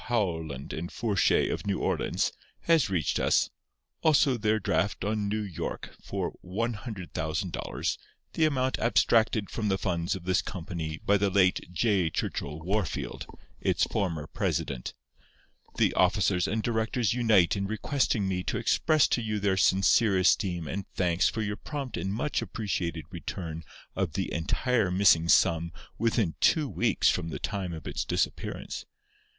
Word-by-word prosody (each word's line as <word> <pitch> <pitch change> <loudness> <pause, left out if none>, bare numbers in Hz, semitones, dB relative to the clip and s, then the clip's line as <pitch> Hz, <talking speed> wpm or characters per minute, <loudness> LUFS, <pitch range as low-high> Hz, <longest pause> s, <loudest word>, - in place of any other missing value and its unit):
Howland 80 - -2
and 85 +2 -5
Fourchet, 105 -6 +2
of - - -4
New 100 - +1
Orleans, - - 0 0.3
has 160 - +3
reached 85 -6 0
us. - - +2 0.5
Also 145 -4 +4
their 110 -1 +1
draft 100 -2 0
on 105 -1 -1
N. 105 -3 -3
Y. - - -2 0.3
for - - -3
$100,000, 95 - -3 0.4
the 160 - +3
amount 130 -4 0
abstracted 110 -2 +2
from 110 -2 -2
the 95 -1 +1
funds 85 -2 -1
of 95 - -8
this 90 +1 +2
company 80 -4 -5
by 100 - +4
the 100 0 +1
late 95 -2 +2
J. 90 -1 +2
Churchill 75 0 -3
Wahrfield, 95 +1 -2 0.3
its - - +1
former 85 -6 -1
president.… 65 -4 -3 0.8
The - - +3
officers 95 -2 +2
and 110 +1 -1
directors 115 -1 0
unite 110 -8 +4
in 100 -1 -2
requesting 110 -1 0
me 90 -1 -1
to - - -1
express 155 -2 +3
to 120 - +1
you 110 -2 -2
their 100 -1 +1
sincere 95 +2 +4
esteem 90 -2 +2
and 100 +4 -4
thanks 85 -2 +2
for 110 - -3
your 105 0 -3
prompt 140 -1 -5
and 95 - -2
much 120 +8 -1
appreciated 85 -7 -3
return 80 -1 -6 0.3
of 95 -5 -1
the 95 +2 -2
entire 110 +5 +1
missing 90 -3 +4
sum 85 0 +4 0.3
within 115 -7 +1
two 155 -3 +4
weeks 120 -4 +1
from 80 - -1
the - - -4
time 90 +3 -3
of 80 -2 -7
its - - -2
disappearance. - - -3
95 Hz, 150 wpm, -28 LUFS, 85-110 Hz, 0.8 s, Also